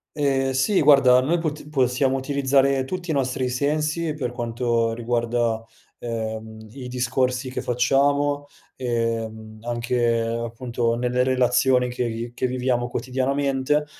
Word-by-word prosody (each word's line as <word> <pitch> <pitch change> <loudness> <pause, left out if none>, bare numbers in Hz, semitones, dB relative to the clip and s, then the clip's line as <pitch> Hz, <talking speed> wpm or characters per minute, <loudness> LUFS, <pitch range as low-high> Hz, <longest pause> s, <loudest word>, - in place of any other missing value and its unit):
Ehm, 135 -3 +1
sì 130 +10 +2
guarda, 130 -3 +6
noi 165 +7 +1
pot 150 -2 -4
possiamo 130 -1 +1
utilizzare 135 0 +2
tutti 180 +4 -5
i - - +1
nostri 130 -1 0
sensi, 150 +5 -1
per 130 -5 -3
quanto 115 -1 -1
riguarda, 115 -1 -1 0.3
ehm, 110 -1 -5
i 125 +2 -8
discorsi 125 +1 -1
che 130 - -4
facciamo, 140 +4 +2 0.3
ehm, 115 -3 -3
anche 120 0 0
appunto 115 +1 -2
nelle 125 +1 +1
relazioni 125 0 +3
che 125 0 -2
vi 115 +1 -5
che - - -1
viviamo 125 -1 0
quotidianamente, 135 +3 0
125 Hz, 125 wpm, -23 LUFS, 120-135 Hz, 0.3 s, guarda